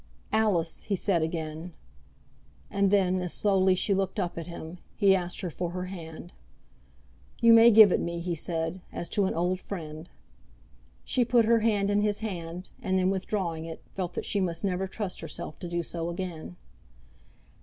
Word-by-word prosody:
"Alice," 200 -7 +2
he 205 - -1
said 180 -2 +1
again. 160 +1 -4 1.0
And 200 0 +2
then, 185 -2 +3
as 180 -1 0
slowly 190 -2 +3
she 200 +2 +1
looked 195 +2 -1
up 180 -3 -2
at 165 0 -6
him, 170 0 -8 0.2
he 195 -3 +5
asked 180 -1 -3
her 180 - -3
for 175 +2 -3
her 180 0 -3
hand. 175 -2 -9 1.1
"You 230 0 +7
may 230 +1 +9
give 215 -3 +8
it - - +2
me," 170 0 -3
he 175 +1 -2
said, 165 +2 -2
"as 170 - -4
to 205 - +1
an - - -1
old 180 +2 0
friend." 160 -4 -7 1.0
She 255 - +2
put 240 -1 +3
her 230 +1 +4
hand 205 -3 +1
in 205 0 +3
his 210 -1 +1
hand, 180 -4 -6
and 190 0 0
then, 185 0 +2
withdrawing 185 -4 -2
it, 165 -1 -8
felt 180 -2 -3
that - - -3
she 205 - 0
must 170 -3 -1
never 190 -1 -1
trust 195 -1 -4
herself 155 -1 -7
to 175 - -6
do 170 0 -1
so 170 +1 -4
again. 170 - -6
185 Hz, 180 wpm, -28 LUFS, 170-200 Hz, 1.1 s, may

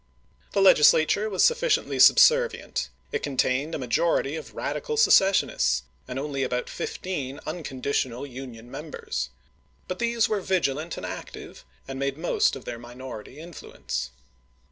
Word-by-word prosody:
The 195 - +3
Legislature 190 +4 +5
was 190 -3 +1
sufficiently 475 -1 +2
subservient; 485 0 +5 0.2
it - - -2
contained 140 +2 0
a - - -1
majority 135 +3 0
of - - -8
radical 460 -2 -3
secessionists, 190 - +4 0.2
and 125 - -5
only 140 0 -3
about 125 -1 -2
fifteen 145 -8 -4
uncon 155 -5 -6
ditional 130 -1 -1
Union 125 -3 -10
members, 65 - -5 0.6
but 185 - -5
these 235 -1 +2
were 210 -2 -1
vigilant 165 -4 -1
and - - -5
active, - - -8 0.2
and 135 0 -6
made 140 0 -1
the - - -16
most 175 - +2
of 135 - -10
their 120 -1 -6
minority 120 +1 -9
influence. 155 - -6
145 Hz, 140 wpm, -26 LUFS, 130-185 Hz, 0.6 s, Legislature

